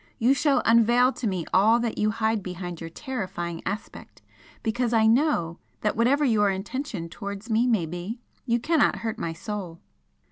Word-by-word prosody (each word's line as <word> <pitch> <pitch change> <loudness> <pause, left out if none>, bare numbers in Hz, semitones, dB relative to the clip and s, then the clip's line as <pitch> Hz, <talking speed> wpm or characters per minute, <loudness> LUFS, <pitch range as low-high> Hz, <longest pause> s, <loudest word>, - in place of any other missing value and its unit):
you 245 +4 +4
shall 280 0 +2
unveil 235 +3 +5
to 235 - -3
me 185 -5 -2
all 220 +5 +5
that 235 -2 -2
you 210 - +2
hide 220 0 0
behind 180 -2 -6
your 165 - -6
terrifying 185 - -5
aspect, 200 +3 -6 0.4
because 235 +1 0
I 220 -1 +4
KNOW 220 - +2 0.2
that 210 - 0
whatever 270 +6 +3
your 210 -5 +3
intention 195 -1 -4
towards 200 +5 -7
me 230 +3 +3
may 220 -9 +2
be, 175 +8 -5 0.3
you 235 0 +2
cannot 315 +5 +2
hurt 225 0 -3
my 165 - -3
Soul!" 175 -1 -6
220 Hz, 170 wpm, -25 LUFS, 185-240 Hz, 0.4 s, unveil